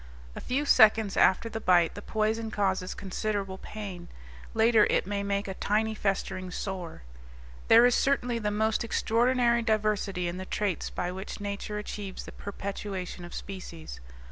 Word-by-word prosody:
A - - -6
few 275 +4 -1
seconds 220 -5 +5
after 190 +4 +4
the 225 - -4
bite 175 -3 +4
the 205 - -8
poison 220 +1 -1
causes 190 -3 -1
considerable 195 -1 -3
pain; 195 -5 -7 0.5
later 225 -1 +5
it - - +2
may 200 +1 -2
make 200 0 -1
a 190 - -3
tiny 215 +3 0
festering 195 -3 -2
sore. 180 - -5 0.6
There 230 +2 +8
is 245 - +4
certainly 245 -4 +1
the 210 -2 -1
most 220 +2 +1
extraordinary 235 +1 +2
diversity 210 -5 0
in 175 +1 -4
the 185 - -5
traits 200 -2 -2
by 180 - -3
which 190 +3 -7
nature 205 +1 -4
achieves 205 -2 -6
the - - -9
perpetuation 195 -2 -6
of 175 - -9
species. 170 - -8
205 Hz, 155 wpm, -28 LUFS, 190-220 Hz, 0.6 s, There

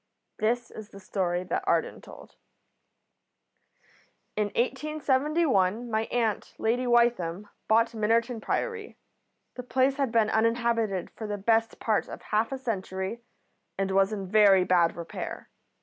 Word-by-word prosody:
This 230 +2 0
is 215 -1 -10
the 195 - -12
story 180 -2 -2
that 185 - -2
Arden - - 0
told. - - -14 2.0
"In 210 - +1
1871 260 - 0
my 220 0 0
aunt, 225 -4 -2
Lady 245 +3 0
Wytham, 220 -6 +2 0.2
bought 230 +2 +3
Minnerton 225 +2 0
Priory. 455 - -3 0.6
The 250 - -6
place 260 +2 +1
had 275 -4 0
been 225 -2 +2
uninhabited 230 -4 0
for 220 - -7
the 205 0 -3
best 225 +2 +1
part 220 -2 0
of - - -9
half 215 +3 0
a 270 - -2
century, 195 -3 -4 0.6
and 195 0 -1
was 195 +1 +3
in 200 -3 -4
very 195 -1 +5
bad 175 -2 +3
repair. 170 -1 -7
225 Hz, 135 wpm, -27 LUFS, 195-240 Hz, 2.0 s, very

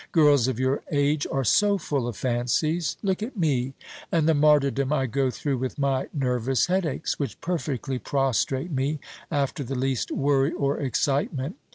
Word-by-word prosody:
Girls 145 -6 +5
of 130 -2 -2
your 130 +2 +1
age 145 0 +1
are 135 0 0
so 205 - +3
full 140 -8 -2
of 120 - -5
fancies. 130 +7 0
Look 190 0 0
at 230 +2 -5
me, 135 -6 0 0.4
and 160 -2 +2
the 160 - +5
martyrdom 145 -2 +3
I 135 -3 +2
go 130 +2 0
through 135 +1 -2
with 130 +3 -3
my 135 -2 0
nervous 125 -2 +1
headaches, 175 -5 -1
which 140 - -3
perfectly 145 -6 -2
prostrate 135 +3 0
me, 140 +2 -1 0.3
after 140 0 -1
the 135 +2 -4
least 130 -1 -1
worry 140 +1 +2
or 140 0 0
excitement. 140 - -1
140 Hz, 165 wpm, -25 LUFS, 130-155 Hz, 0.4 s, Girls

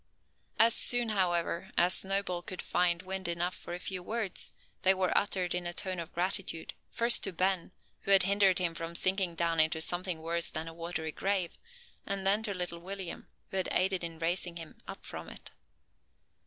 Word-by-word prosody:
As 230 +1 +7
soon, 245 -1 +3
however, 180 -2 0
as 180 +2 +5
Snowball 195 -2 -1
could 180 0 -6
find 175 -1 +1
wind 190 -1 -4
enough 175 +1 -1
for - - -10
a - - -4
few 185 0 -5
words, 215 0 -4 0.3
they 190 +1 +5
were 185 -1 0
uttered 185 -3 +2
in 175 0 -2
a 175 - -3
tone 185 -3 -3
of 165 - -6
gratitude, 180 -2 -2 0.2
first 235 0 +5
to 195 - -1
Ben, 185 0 0 0.3
who - - -8
had 195 -2 +7
hindered 195 -1 +3
him 175 -2 0
from 165 0 -6
sinking 185 -1 0
down 165 -1 0
into 160 0 +3
something 175 0 +2
worse 170 +1 0
than 160 0 -4
a 165 - -7
watery 165 -1 -4
grave; 190 0 -1 0.5
and 195 -1 -2
then 200 +3 +5
to 215 -2 0
little 175 -2 -3
William, 190 0 -7 0.2
who 190 - -3
had 185 - 0
aided 185 0 +2
in 165 -1 -4
raising 170 +1 -1
him 165 -2 -8
up - - -9
from - - -7
it. - - -11
180 Hz, 190 wpm, -31 LUFS, 170-195 Hz, 0.5 s, As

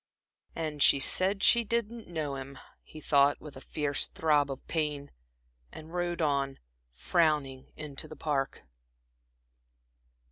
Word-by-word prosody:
"And 155 -3 -4
she 140 - +7
said 190 +8 +2
she 235 0 +6
didn't 230 0 -3
know 155 -5 -4
him," 135 0 -8 0.2
he 155 - -13
thought, 140 -1 +3
with 150 -2 -11
a 130 - -10
fierce 145 -1 0
throb 150 -3 +1
of 135 -1 -7
pain, 150 -3 -3 0.6
and 160 +2 -11
rode 175 -1 -2
on, 140 -2 0 0.3
frowning, 140 - 0
into 150 -3 -6
the 155 - -10
Park. 140 -4 -2
150 Hz, 130 wpm, -29 LUFS, 140-165 Hz, 0.6 s, she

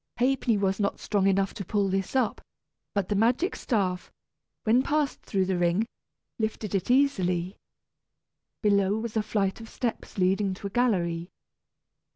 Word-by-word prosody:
Ha'penny 250 -2 +2
was 195 0 0
not 200 -1 0
strong 200 -2 +1
enough 195 0 +2
to 200 - -5
pull 200 +1 0
this 195 +4 -2
up; 250 -5 +1 0.5
but 200 -3 +1
the - - 0
magic 240 - +2
staff, 185 -6 -1 0.5
when 230 +3 +4
passed 290 0 0
through 190 -2 0
the 185 -1 0
ring, 175 +5 +2 0.5
lifted 220 -1 -2
it 195 +1 -1
easily. 190 -9 +2 1.1
Below 200 -1 +3
was 225 0 -4
a 220 - +3
flight 210 -1 -1
of 225 - -10
steps, 235 -4 -4
leading 190 +1 +2
to 200 - -11
a 200 - -3
gallery. 175 -8 +1
200 Hz, 155 wpm, -27 LUFS, 190-230 Hz, 1.1 s, when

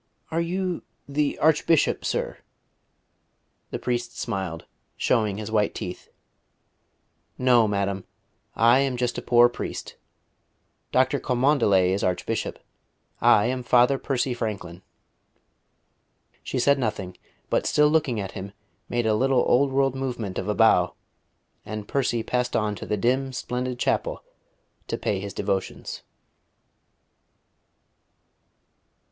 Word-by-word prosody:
"Are 165 +1 +1
you 180 +1 -2 0.3
the 145 +1 0
Archbishop, 160 +1 +3
sir?" - - -2 1.3
The - - -3
priest 120 -1 -3
smiled, 90 -4 -4 0.3
showing 110 -5 +1
his 110 0 -5
white 105 -2 +1
teeth. 90 - -6 1.3
"No, 125 -3 +4
madam; 100 -2 -1 0.5
I 120 +3 +5
am 135 -2 0
just 120 0 -1
a - - -7
poor 120 0 +6
priest. 120 - -6 0.9
Dr. - - +2
Cholmondeley 120 -8 +3
is 100 - -1
Archbishop. 90 -1 -1 0.6
I 105 - +5
am 125 +1 -1
Father 125 +2 +4
Percy 130 -1 -1
Franklin." 100 -7 -5 1.6
She - - -4
said 140 +3 +3
nothing, 105 -6 -3 0.4
but - - +1
still 150 0 +4
looking 150 -7 +1
at 95 -2 -4
him 100 0 -7 0.4
made 120 -1 0
a 110 - +3
little 130 +3 +3
old 135 +2 +3
world 135 -1 +2
movement 125 -7 -3
of 95 - -5
a 105 - 0
bow; - - +4 0.7
and 105 -1 -6
Percy 120 -4 0
passed 125 +1 -1
on 105 -1 +1
to - - -8
the 105 - 0
dim, 130 +5 0
splendid 125 0 -3
chapel - - -1 0.6
to - - -2
pay 100 - -1
his 100 -1 -7
devotions. 95 -2 -3
120 Hz, 120 wpm, -25 LUFS, 105-135 Hz, 1.6 s, poor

